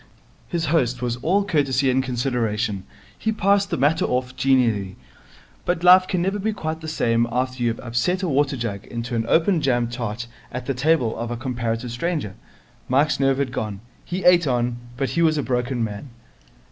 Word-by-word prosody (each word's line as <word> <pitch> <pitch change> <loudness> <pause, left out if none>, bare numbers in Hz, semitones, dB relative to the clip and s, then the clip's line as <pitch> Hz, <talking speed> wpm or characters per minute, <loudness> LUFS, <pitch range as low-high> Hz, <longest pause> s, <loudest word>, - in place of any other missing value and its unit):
His 170 -2 -2
host 125 -6 +1
was 120 -1 -1
all 190 +10 +1
courtesy 140 -7 +2
and 130 +1 +2
consideration. 120 -6 -1 0.3
He 220 - -1
passed 200 -1 +2
the - - -1
matter 145 +5 +2
off 125 +1 -1
genially. 120 -7 +2 0.7
But 175 -1 -1
life 185 +1 +7
can 180 -2 0
never 195 +2 -1
be 215 +2 -1
quite 160 -5 -4
the 160 - -7
same 120 -6 +1
after 130 +1 -2
you 120 - +2
have 115 - -4
upset 120 +11 -1
a - - +1
water 140 -2 +1
jug 110 -4 -4
into 120 +1 -5
an 115 0 -1
open 170 0 +3
jam 120 -4 +1
tart 120 -1 -4 0.3
at 125 0 -5
the 135 - -1
table 130 -3 +1
of 115 +1 -4
a 120 - -3
comparative 120 -1 -3
stranger. 140 - -2 0.6
Mike's 145 +4 +2
nerve 135 -1 +3
had 140 -2 -1
gone. 105 -4 -4 0.2
He 185 +2 -4
ate 175 -3 +6
on, 120 -1 0 0.2
but 135 0 -1
he 170 - 0
was 160 -2 +3
a 145 - 0
broken 125 -1 -1
man. 110 +5 -5
130 Hz, 190 wpm, -23 LUFS, 120-160 Hz, 0.7 s, life